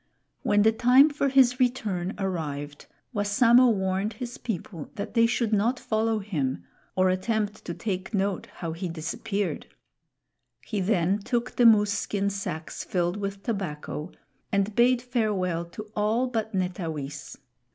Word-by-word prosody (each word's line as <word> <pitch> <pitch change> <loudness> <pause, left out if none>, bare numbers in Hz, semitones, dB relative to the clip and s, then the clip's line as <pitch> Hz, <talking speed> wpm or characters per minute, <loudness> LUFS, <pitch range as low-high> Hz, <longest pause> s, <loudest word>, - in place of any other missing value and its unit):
When 205 0 +3
the 220 - +5
time 255 +6 +5
for 285 -1 0
his 260 -1 +4
return 210 -8 0
arrived, 150 -6 -4 0.3
Wassamo 230 +4 +5
warned 190 +1 -1
his 240 +3 -7
people 175 -7 -5
that 205 +1 -5
they 230 0 +5
should 230 -2 0
not 230 +5 +2
follow 220 0 0
him 145 - -2 0.3
or 185 0 +3
attempt 210 +3 -1
to 170 - -4
take 190 -3 -3
note 200 -3 -1
how 165 -2 -5
he 175 +2 -4
disappeared. 175 +5 -3 1.0
He 210 -3 -2
then 190 0 +2
took 240 +4 -2
the 240 - +6
moose 210 -2 +5
skin 200 -1 -1
sacks 180 -5 -5
filled 175 +1 -1
with 200 -1 -4
tobacco 175 -6 -4 0.4
and 200 +1 +1
bade 240 +2 +3
farewell 200 -8 0
to 170 +5 -8
all 215 +4 +1
but 225 -3 -2
Netawis. 160 -6 -4
205 Hz, 140 wpm, -26 LUFS, 180-230 Hz, 1.0 s, the